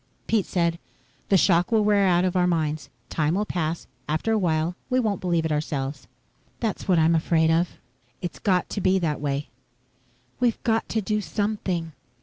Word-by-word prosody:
Pete 220 -4 +1
said, 170 -2 0 0.5
"The 195 - +5
shock 175 +1 +3
will 220 -2 +4
wear 205 -2 +4
out 175 0 +3
of 185 0 -1
our 180 -1 +3
minds. 155 -3 -1 0.2
Time 155 +1 +1
will 210 +2 0
pass. 165 -4 -2 0.2
After 155 +9 0
a 220 - +3
while, 165 -1 0
we 255 0 +2
won't 215 -5 0
believe 170 -3 +1
it 160 - -1
ourselves." 145 -2 -3 0.5
"That's 220 -3 -3
what 185 -3 +4
I'm 160 +1 +4
afraid 160 0 +3
of." 170 +2 +1 0.4
"It's 175 - -5
got 185 -3 +1
to 205 - -2
be 185 +1 +3
that 155 -6 -1
way." 145 0 -2 0.9
"We've 240 -2 +1
got 225 -1 +1
to 220 - 0
do 210 +1 -1
something." 185 -2 -2
175 Hz, 180 wpm, -25 LUFS, 160-205 Hz, 0.9 s, The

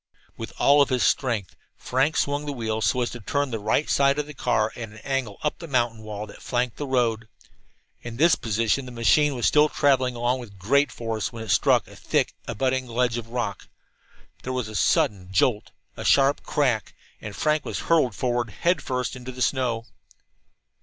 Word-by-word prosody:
With - - -7
all 145 +1 +5
his 130 -3 0
strength 115 - 0 0.2
Frank 135 +5 0
swung 145 +1 0
the - - -1
wheel 110 -3 -3
so 125 - +1
as 120 - -1
to 120 - -7
turn 140 +5 -1
the 115 - -2
right 110 +8 +1
side 140 0 +3
of 150 - -1
the 150 - -10
car 110 -5 0
at 115 -2 -6
an 105 - -14
angle 135 -7 -2
up 150 - -1
the 165 - -8
mountain 120 -5 0
wall 105 -1 -6
that 105 - -14
flanked 125 -1 -1
the 145 - -4
road. 120 -4 0 0.7
In 115 -1 -8
this 165 +4 +5
position 115 +4 0
the - - -8
machine 135 +5 +3
was 120 - -1
still 150 0 +5
traveling 130 -4 +2
along 120 +2 0
with 105 -5 -11
great 135 +8 +2
force 115 -2 -3
when 115 -2 -7
it 110 - -9
struck - - +3
a - - -14
thick - - 0
abutting 130 +2 -1
ledge 120 0 0
of 115 -1 -10
rock. 120 0 -4 0.7
There 130 - -4
was 125 -4 -2
a 110 - -9
sudden 95 -3 +1
jolt, 105 +3 +1 0.3
a - - -7
sharp 140 +1 +4
crack, 125 -7 0 0.3
and - - -7
Frank 155 0 +1
was - - -4
hurtled 155 -10 +2
forward 120 -2 -1
head 175 - 0
first 125 -1 -3
into 125 0 -7
the 125 - -11
snow. 120 -4 0
125 Hz, 195 wpm, -25 LUFS, 115-140 Hz, 0.7 s, all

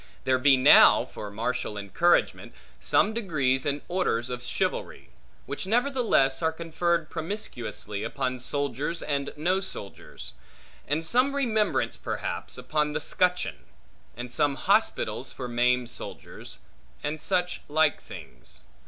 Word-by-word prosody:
There 130 0 +2
be 135 0 +6
now, 130 - +7
for 105 - -8
martial 110 0 -3
encouragement, 105 - +1 0.3
some 215 - +2
degrees 145 - 0
and 145 0 -1
orders 130 -10 0
of 125 -1 -4
chivalry; 125 - -3 0.4
which 145 +6 -5
nevertheless 235 - +2
are 160 -1 +2
conferred 165 0 -1
promiscuously, 115 - -4
upon 130 -2 -2
soldiers 145 +4 -2
and 140 -1 -2
no 180 +5 +1
soldiers; 105 - -8 0.5
and 150 +4 -1
some 255 +9 +2
remembrance 220 -7 +1
perhaps, - - -4
upon 150 -1 -1
the 150 - -1
scutcheon; 180 +3 0 0.5
and 120 0 -6
some 145 -2 +2
hospitals - - +1
for 125 - -6
maimed 120 0 +1
soldiers; - - -7 0.5
and 150 +1 -3
such 180 +3 0
like 155 0 +2
things. - - -9
150 Hz, 125 wpm, -27 LUFS, 125-175 Hz, 0.5 s, now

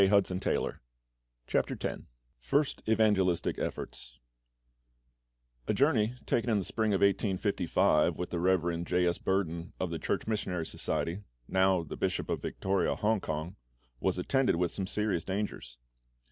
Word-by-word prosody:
CHAPTER 95 -1 +2 1.0
X - - -3 0.4
FIRST 140 - 0
EVANGELISTIC 105 -5 +2
EFFORTS - - -5 1.5
A - - +1
JOURNEY 125 -3 +3
taken 120 0 +1
in 110 - +3
the 100 - 0
spring 110 +3 0
of - - -1
1855 95 -5 +2
with 90 - -4
the 85 - -1
Rev. 85 -2 +1
J. 90 +1 +1
S. 85 0 +1
Burden 85 -3 -1
of 95 -2 -2
the 85 - -3
Church - - -1
Missionary 90 -6 -2
Society 85 +4 -2 0.3
(now 95 -2 +3
the 80 - -7
Bishop - - -1
of - - -1
Victoria, 95 -1 0
Hong 110 0 +1
kong) 80 +2 -4 0.4
was 95 -1 0
attended 135 +7 +2
with 90 +1 0
some 95 -2 -3
serious 105 -5 0
dangers. 95 -11 -4
95 Hz, 135 wpm, -31 LUFS, 85-105 Hz, 1.5 s, JOURNEY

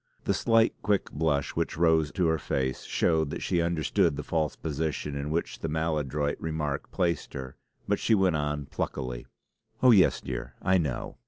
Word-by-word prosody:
The - - +1
slight, 115 0 +3
quick 105 -2 0
blush 75 -2 0
which - - -1
rose 80 -2 +3
to 90 -3 +1
her 80 -1 +2
face 65 -2 -2
showed 80 -3 +1
that - - -5
she 85 - +1
understood 85 0 +1
the - - -4
false 80 -3 -1
position 75 -1 -3
in 70 +1 -3
which 80 +2 -2
the - - -3
maladroit 75 -2 -1
remark 75 -3 -3
placed 85 -2 -1
her; 65 -1 -6 0.3
but - - +1
she 110 - +3
went 95 -4 +3
on 75 -1 -2
pluckily: 65 -2 -4 0.6
"Oh, 130 - +8
yes, 100 -5 +5
dear, 60 -2 -6
I 95 0 +3
know! 70 -7 -3
80 Hz, 175 wpm, -28 LUFS, 70-85 Hz, 0.6 s, Oh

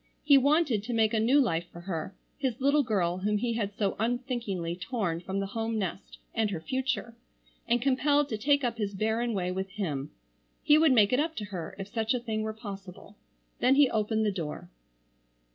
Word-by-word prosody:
He 290 -1 +6
wanted 280 -4 +3
to 240 +4 -4
make 220 0 +3
a 220 - +2
new 250 +6 +4
life 170 -10 +1
for 170 - -10
her, 175 +1 -4 0.2
his 260 -3 -1
little 280 +2 +4
girl 185 -8 0
whom 210 +2 +1
he 235 +2 -1
had 210 -3 -2
so 205 -4 0
unthinkingly 230 -7 -2
torn 180 -3 -2
from 190 +3 -3
the 195 - -1
home 225 0 -1
nest - - -4 0.2
and 220 -2 +1
her 185 -5 -3
future, 240 +3 -2 0.5
and 240 0 +2
compelled 285 +2 +3
to 220 - -2
take 285 +3 +3
up 235 -2 -1
his 205 -2 -2
barren 220 +3 0
way 180 -2 -1
with 190 +1 -3
him. 155 -9 -3 0.5
He 295 - +6
would 315 -2 +5
make 215 -3 +5
it 250 - +3
up 320 +2 -1
to 210 - -4
her 185 -5 -6
if 195 -1 -6
such 225 +3 -1
a - - 0
thing 220 -2 -3
were 220 0 -2
possible. 200 -2 -9 0.4
Then 255 +2 +4
he 280 -2 +5
opened 220 0 +1
the 210 - +2
door. 175 -1 -6
220 Hz, 205 wpm, -29 LUFS, 195-250 Hz, 0.5 s, He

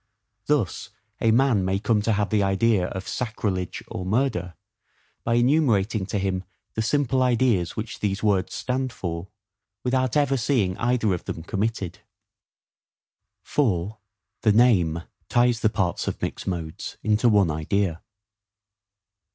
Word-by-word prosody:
Thus - - 0 0.3
a 115 - +3
man 115 -3 +3
may 95 +1 +1
come 105 +1 +1
to 110 +2 +1
have 105 0 0
the 105 -1 +3
idea 95 0 +2
of 95 0 -6
SACRILEGE 105 -7 -3
or 90 - -5
MURDER, 95 - 0 0.7
by 115 - +1
enumerating 120 -7 +2
to 105 - -2
him 95 -1 -1 0.3
the 110 - -1
simple 130 +2 +1
ideas 120 -8 +2
which 110 -1 -5
these 100 0 -1
words 100 -3 +1
stand 130 0 -2
for; 85 -2 -5 0.6
without 130 +1 +1
ever 140 -2 +2
seeing 110 -7 +1
either 120 -4 +2
of 90 - -4
them 80 - -5
committed. 100 -1 -2 1.4
4. 105 - 0 0.4
The 110 - +4
Name 90 -9 +3 0.3
ties 120 -1 +3
the 110 - +3
Parts 95 -4 -1
of - - -2
mixed - - -4
Modes 85 -4 -4
into 110 +3 +3
one 100 -6 +4
Idea. 85 +2 -1
105 Hz, 135 wpm, -25 LUFS, 95-120 Hz, 1.4 s, The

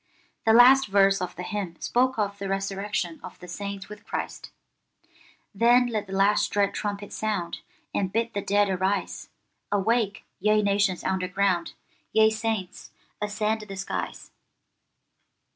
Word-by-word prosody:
The 220 - +6
last 255 +3 +7
verse 195 -1 +4
of 180 -1 -4
the 180 - -6
hymn 195 -3 -4
spoke 255 +1 +1
of 200 -1 -1
the 195 -1 -4
resurrection 195 -3 -2
of - - -10
the 180 - -12
saints 200 +2 -6
with 210 0 -11
Christ— - - -5 1.0
'Then 240 +4 +5
let 215 -3 -2
the 190 - -7
last 200 +2 +3
dread 200 -1 +1
trumpet 205 -1 -4
sound, 205 -6 -2 0.3
And 190 -2 -1
bid 230 +2 -1
the 200 - -2
dead 205 +1 +2
arise; 190 +1 -1 0.4
Awake, 210 +1 +1 0.2
ye 210 +2 +3
nations 200 -2 +1
underground, 185 -1 0 0.4
Ye 220 0 +5
saints, 220 -4 -3 0.3
ascend 210 +1 -1
the 205 -2 -8
skies. 190 - -5
205 Hz, 140 wpm, -26 LUFS, 195-215 Hz, 1.0 s, last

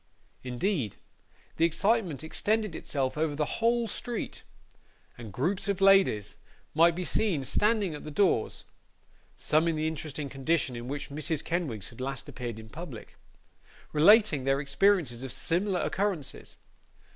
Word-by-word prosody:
Indeed, 130 - -1 0.6
the 165 - +4
excitement 180 - +1
extended 210 +4 0
itself 135 -1 -2
over 155 -2 0
the 150 0 -2
whole 235 0 +2
street, 235 +2 -4 0.7
and 115 -3 -9
groups 175 - -1
of 200 -1 0
ladies 195 - +4 0.4
might 165 +2 +5
be 180 - -3
seen 180 -6 0
standing 210 - +1
at 150 - -7
the - - -7
doors, 150 - +1 0.7
(some 155 +2 +2
in 165 - +1
the 155 0 -1
interesting 155 -2 -4
condition 135 -1 0
in 120 +1 -6
which 140 +1 -5
Mrs. 155 +1 -1
Kenwigs 140 - -2
had 120 +1 -11
last 135 +1 -3
appeared 120 -3 -6
in 110 0 -10
public,) - - -9 0.8
relating 165 - +5
their 135 +1 +2
experiences 140 -3 +2
of 135 -1 -5
similar 180 +6 0
occurrences. 190 -8 -2
155 Hz, 140 wpm, -29 LUFS, 135-195 Hz, 0.8 s, might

